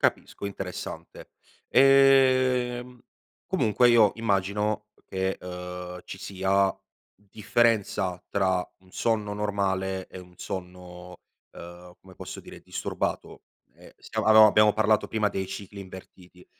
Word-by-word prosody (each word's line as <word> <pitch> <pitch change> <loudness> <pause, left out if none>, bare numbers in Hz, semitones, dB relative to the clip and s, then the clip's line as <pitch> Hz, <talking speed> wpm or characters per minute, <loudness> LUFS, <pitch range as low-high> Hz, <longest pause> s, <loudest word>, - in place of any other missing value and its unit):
Capisco. - - -1
Interessante. 95 -2 -8 0.4
Ehm, 130 -2 +4 0.5
comunque 125 - +2
io 115 -4 +5
immagino, 105 0 -1
uhm, - - -29
che, 95 0 -2
uhm, 90 0 -7
ci 95 - -9
sia 95 0 0 0.4
differenza 105 -3 0
tra 95 -2 0
un 95 0 -23
sonno 110 0 -1
normale 95 -2 -2
e - - -10
un 90 -1 -14
sonno, 90 -1 -8 0.4
uhm, 90 +1 -12
come 95 -1 -16
posso - - -8
dire, - - -13
disturbato, - - -4 0.3
ehm, - - -17
siam - - -4
ab 110 0 +5
abbiamo 105 0 +7
parlato 110 0 +2
prima 110 -2 0
dei 95 -1 -4
cicli 100 +1 -8
invertiti. 90 -1 -13
100 Hz, 120 wpm, -26 LUFS, 90-110 Hz, 0.5 s, abbiamo